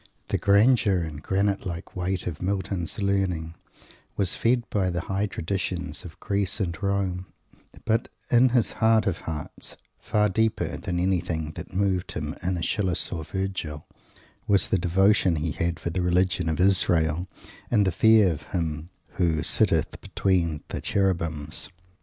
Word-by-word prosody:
The - - 0
grandeur 100 -2 +4
and 75 -2 -6
granite 100 +3 0
like 85 0 -6
weight 90 0 -2
of 85 -2 -5
Milton's 95 -2 -2
learning 95 -5 0 0.6
was 95 -3 0
fed 120 +1 +1
by 95 -3 +1
the 90 0 -2
high 100 +4 -1
traditions 90 0 -3
of 85 -2 -11
Greece 100 0 -1
and 85 -5 -1
Rome; 95 -2 -1 0.6
but, 110 0 +1 0.2
in 125 +2 +6
his 120 -2 +2
heart 110 -1 +3
of 90 -4 -1
hearts, 75 -3 -6 0.2
far 105 0 +1
deeper 105 -5 0
than 90 -3 -3
anything 90 -4 -1
that - - -9
moved 95 -2 0
him 75 0 -3
in 90 0 -1
Aeschylus 90 +1 -1
or 80 -3 -3
Virgil, 90 -4 -4 0.6
was 100 -3 +3
the 95 - +2
devotion 95 +1 +3
he 80 +1 -1
had 85 0 -2
for 85 - -3
the 90 - -1
religion 90 -1 +1
of 80 - -2
Israel, 90 -3 +3 0.4
and 105 -4 +3
the 95 - +2
Fear 110 0 +5
of 75 - -5
Him 80 -1 -3 0.3
who 80 -4 +2
"sitteth - - +2
between 85 -6 0
the - - -4
Cherubims." 85 -6 0
90 Hz, 155 wpm, -26 LUFS, 85-100 Hz, 0.6 s, in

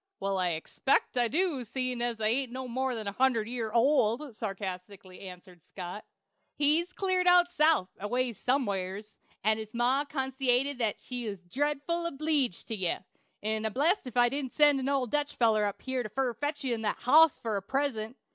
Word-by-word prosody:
"Well, 195 -1 -1
I 180 -1 +1
expect 160 +14 0
I 245 -1 +3
do, 310 -1 0
seein' 255 +1 -2
I 240 -1 -1
ain't 240 +4 +1
more'n 255 -2 -3
a - - -1
hundred 235 -1 +1
year 230 -2 -3
old," 240 +1 +2
sarcastically 190 -2 -6
answered 180 -2 -12
Scott. 180 +4 -8 0.5
"He's 310 +5 +3
cleared 370 -1 0
out 355 0 +6
South 305 - +3
aways 240 +1 -1
some'eres, 205 -5 -2 0.2
and 220 +1 +2
his 220 +1 -8
ma 250 +4 +2
consaited 265 -1 0 0.2
she 245 -3 -5
was 195 -3 -8
dredful 295 - -1
obleeged 290 - -1
to 225 - -1
ye; 185 -4 -1 0.5
'n 215 0 -1
I'm 220 -1 -2
blessed 310 +4 +1
if 250 - -9
she 240 0 +5
didn't 275 -2 -3
send 295 -2 +5
an 265 +1 -2
old 270 -4 0
Dutch 295 0 -1
feller 220 -3 +3
up 205 - -3
here 260 -1 -2
fur 255 +2 -1
to 230 - -32
fetch 290 +2 -2
ye 250 -3 0
that 220 -1 -2
hoss 310 +4 +6
fur 220 -3 -2
a - - -3
present. 250 0 -2
250 Hz, 175 wpm, -29 LUFS, 215-280 Hz, 0.5 s, out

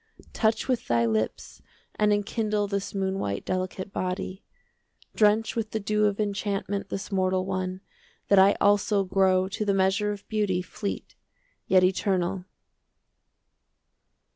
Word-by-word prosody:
30 - - -21
Touch 220 +2 +1
with 255 -3 -1
thy 115 0 +2
lips 110 -1 -2 0.3
and 210 0 +2
enkindle 210 0 0
This 200 0 -3
moon 195 0 -1
white 100 - -3
delicate 185 +1 -3
body, 185 +1 -3 0.7
Drench 215 +1 +3
with 225 -2 -2
the 220 - -2
dew 210 +1 +1
of 205 0 -2
enchantment 200 -1 -2
This 195 - -5
mortal 185 -1 +1
one, 185 -1 -3 0.5
that 200 - +5
I 195 +2 +6
also 205 0 +3
Grow 190 -1 +2
to 215 +2 -3
the 200 -2 +1
measure 195 +2 +2
of 205 -1 -8
beauty 205 -4 0
35 - - -22
Fleet 200 -2 -4 0.5
yet 185 -1 +5
eternal. 185 0 0
195 Hz, 140 wpm, -26 LUFS, 185-210 Hz, 0.7 s, I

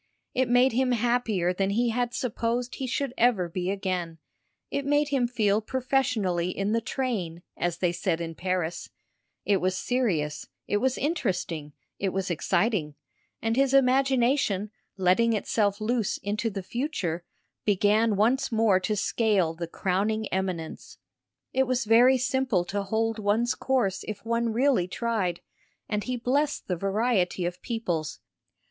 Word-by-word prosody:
It 255 -1 +1
made 250 +2 +5
him 255 +1 +1
happier 230 -6 +1
than 195 +1 0
he 235 +4 +1
had 240 +1 0
supposed 240 +1 -2
he 265 - -4
should 255 +1 -2
ever 220 -7 +3
be 180 +2 -3
again; 185 -4 -2 0.5
it 280 - -1
made 290 +1 +2
him 265 -4 +1
feel 215 -3 +1
professionally 240 -8 0
in 195 +2 -2
the 230 +1 +1
train, 210 -10 -3
as 175 -1 -1
they 180 -1 +1
said 175 -1 -1
in 165 -1 -4
Paris; 175 -1 -2 0.6
it 200 - +3
was 185 0 0
serious, 180 -14 -1 0.2
it 205 - +1
was 260 +3 0
interesting, 180 - -2 0.3
it 195 - 0
was 185 -1 -2
exciting, 175 -3 0 0.5
and 225 0 +1
his 270 +1 +3
imagination, 255 -5 +2 0.3
letting 190 +5 +3
itself 205 -1 0
loose 225 -1 0
into 210 +3 -2
the 195 -2 -5
future, 190 - -3 0.4
began 210 +2 +3
once 240 +7 +2
more 220 -4 +3
to 200 +3 -1
scale 200 -5 +1
the 170 +1 -5
crowning 200 +5 -1
eminence. 185 -4 -4 0.6
It 265 0 +2
was 255 -1 0
very 245 +4 +6
simple 255 -7 +1
to 200 +3 -2
hold 225 +2 -1
one's 215 +4 +1
course 235 -8 0
if 215 0 -6
one 230 0 0
really 240 -5 +2
tried, 195 -5 -1 0.5
and 210 -1 -1
he 250 -1 -2
blessed 280 +5 0
the 180 - 0
variety 195 -1 0
of 175 0 -4
peoples. 175 -10 -3
215 Hz, 150 wpm, -27 LUFS, 185-245 Hz, 0.6 s, very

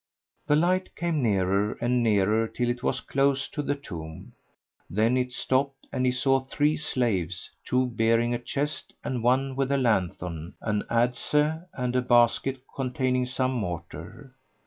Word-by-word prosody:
The 150 - +4
light 180 +4 +1
came 170 -4 -1
nearer 100 -2 +1
and 120 +1 +1
nearer 110 0 +3
till 120 +2 -2
it 120 0 -5
was 130 - -1
close 135 0 +1
to 150 - -3
the 145 0 -1
tomb; 80 - -9 0.6
then 110 +7 +2
it 125 0 0
stopped 135 +2 -1
and 130 - +1
he - - +4
saw 135 +1 +2
three 145 +3 +1
slaves, 100 - -1
two 130 0 +1
bearing 115 0 +2
a 120 - -1
chest 145 +4 -3
and 125 -2 -2
one 130 +3 +2
with 135 0 0
a 140 - +3
lanthorn, 90 - -1
an 105 -2 -1
adze 125 +6 +2 0.2
and 125 -1 -2
a 125 - +3
basket 125 +2 +3
containing 130 -1 0
some 130 +1 0
mortar. 120 - -6
125 Hz, 155 wpm, -27 LUFS, 115-135 Hz, 0.6 s, The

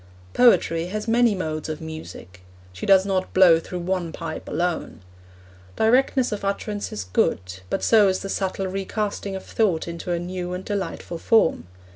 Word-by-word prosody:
Poetry 175 -9 +4
has 210 +4 -4
many 230 -1 +3
modes 155 -4 -4
of 155 - -4
music; 160 - -9 0.3
she 95 - -6
does 190 -1 +6
not 190 -1 -2
blow 180 -3 +7
through 180 +2 -6
one 175 -2 -2
pipe 160 -1 -6
alone. 170 - -2 0.7
Directness 250 +2 +2
of 210 -1 -4
utterance 205 +1 -3
is 105 - -4
good, 90 0 -1
but - - -2
so 215 -3 +5
is 185 -1 0
the 195 - -5
subtle 195 0 -2
recasting 195 +1 -3
of 190 - -6
thought 185 -9 0
into 170 +1 -5
a 175 - +1
new 180 +1 -4
and 185 +1 -6
delightful 195 -4 -4
form. 165 - +2
185 Hz, 165 wpm, -23 LUFS, 165-205 Hz, 0.7 s, blow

